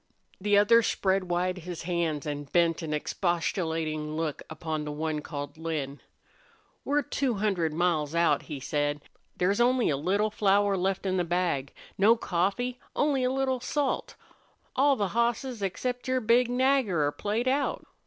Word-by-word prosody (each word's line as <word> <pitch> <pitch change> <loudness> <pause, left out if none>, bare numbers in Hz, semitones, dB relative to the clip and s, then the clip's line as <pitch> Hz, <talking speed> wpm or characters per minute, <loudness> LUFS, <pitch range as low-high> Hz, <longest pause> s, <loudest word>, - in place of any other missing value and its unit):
The 205 +1 +3
other 220 +3 +6
spread 195 -3 +1
wide 180 +1 -1
his 175 -1 -7
hands 165 -4 -1
and 145 -1 -5
bent 170 -1 +2
an 160 -2 -4
expostulating 160 -2 -1
look 160 -3 -2
upon 155 -1 -4
the 150 - -4
one 155 +1 -2
called 145 0 -7
Lin. 150 -4 -3 0.8
"We're 290 +1 +1
two 270 -4 -1
hundred 195 -6 0
miles 160 -2 0
out," 170 0 +3
he 145 -3 -4
said. 145 +1 -1 0.4
"There's 195 +5 +2
only 245 -5 +3
a 140 - 0
little 200 +8 +1
flour 200 -1 +3
left 190 +1 -1
in 185 -1 0
the 180 - +2
bag. 170 -6 -1 0.3
No 215 +4 +6
coffee! 225 +6 -1 0.2
Only 285 -3 +2
a 250 - +2
little 265 -1 0
salt! 280 +2 -2 0.6
All 280 +1 +4
the 205 -5 -1
hosses 235 +1 -1
except 245 +7 -3
your 255 0 +2
big 240 +1 +3
Nagger 250 - +2
are 145 - +1
played 215 +9 -2
out. 275 +2 0
185 Hz, 160 wpm, -28 LUFS, 160-235 Hz, 0.8 s, other